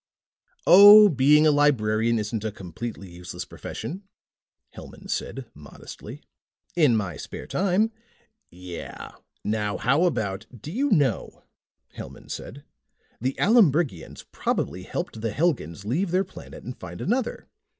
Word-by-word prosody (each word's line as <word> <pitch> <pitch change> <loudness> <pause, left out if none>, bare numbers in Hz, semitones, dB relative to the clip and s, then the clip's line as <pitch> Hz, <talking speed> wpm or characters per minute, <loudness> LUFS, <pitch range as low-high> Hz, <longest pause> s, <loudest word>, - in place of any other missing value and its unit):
"Oh, 205 +2 +10
being 150 +1 +4
a 155 - +6
librarian 115 -6 +2
isn't 105 0 -3
a 110 - -2
completely 100 +2 -7
useless 90 0 -8
profession," 185 +6 -7 0.7
Hellman - - -10
said - - -4
modestly. - - -11 0.5
"In 145 -9 +4
my 100 -4 -3
spare - - -8
time 200 +4 +1 0.4
" 220 +1 -52 0.2
"Yeah. - - -8 0.3
Now 105 -1 -1
how 140 +10 +2
about 105 - -2
" 115 - -15
"Do 155 - -6
you 275 +9 0
know," 145 - 0 0.5
Hellman - - -10
said, 140 +3 -8 0.6
"the 130 +3 -2
Aloombrigians 170 - +2
probably - - -2
helped 110 - -5
the 115 - -1
Helgans 115 - -1
leave 165 - -1
their 185 +3 +2
planet - - -12
and 125 - -7
find 90 -1 -9
another. 240 +4 -2
135 Hz, 130 wpm, -25 LUFS, 105-180 Hz, 0.7 s, Oh